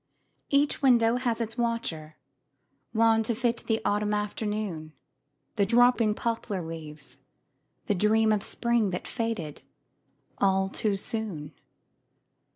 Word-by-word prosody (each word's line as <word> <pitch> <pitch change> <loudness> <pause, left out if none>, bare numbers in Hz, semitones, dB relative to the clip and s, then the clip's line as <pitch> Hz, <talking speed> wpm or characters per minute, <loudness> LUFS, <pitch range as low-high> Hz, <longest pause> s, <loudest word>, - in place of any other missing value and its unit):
Each 285 +1 +2
window 240 -3 +4
has 240 -2 -1
its 230 +1 -4
watcher 170 -10 -2 0.8
wan 225 0 +4
To 225 +1 -1
fit 240 0 -1
the 225 -1 +1
autumn 210 0 +1
afternoon, 210 -6 -3 0.6
The 200 - +3
dropping 235 -1 +4
poplar 225 -5 -2
leaves, 150 -5 -9 0.7
the - - +1
dream 220 +3 +3
Of 210 -1 +2
spring 235 -1 0
that 180 0 -4
faded 225 - -3 0.8
all 190 -1 +2
too 205 0 -1
soon. 195 -8 -4
215 Hz, 115 wpm, -27 LUFS, 190-230 Hz, 0.8 s, window